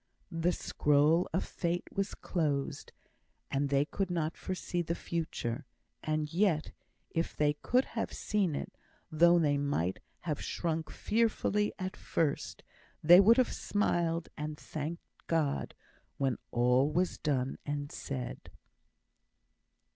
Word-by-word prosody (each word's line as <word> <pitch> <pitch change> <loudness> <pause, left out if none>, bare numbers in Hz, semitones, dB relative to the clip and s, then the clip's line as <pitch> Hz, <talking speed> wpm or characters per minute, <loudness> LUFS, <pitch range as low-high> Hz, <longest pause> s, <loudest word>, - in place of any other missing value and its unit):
The 165 +1 +1
scroll 150 +1 +2
of 180 - 0
Fate 175 0 -2
was 195 0 -2
closed, 150 -6 -2 0.6
and 140 +1 +1
they 140 +1 +3
could 190 +4 -2
not 165 -3 -1
foresee 180 -1 -3
the 170 0 -2
Future; 150 -7 -3 0.4
and 155 0 -1
yet, 170 -4 +2 0.4
if 165 +1 -1
they 150 -1 +3
could 255 +2 +3
have 225 - -3
seen 195 -8 0
it, - - -5 0.4
though 170 +2 +6
they 145 -4 +2
might 95 - 0 0.2
have 150 -4 -3
shrunk 160 -2 -2
fearfully 210 -2 +1
at 185 0 -4
first, 155 -4 -1 0.4
they 175 +3 +9
would 225 +5 +7
have 255 - +3
smiled 170 -5 0
and 150 0 -4
thanked 155 +3 -5 0.2
God 155 -4 0 0.4
when 135 -3 0
all 125 +4 +3
was 180 +3 0
done 135 -3 -1
and 145 0 -3
said. 130 -3 -5
160 Hz, 125 wpm, -32 LUFS, 145-175 Hz, 0.6 s, they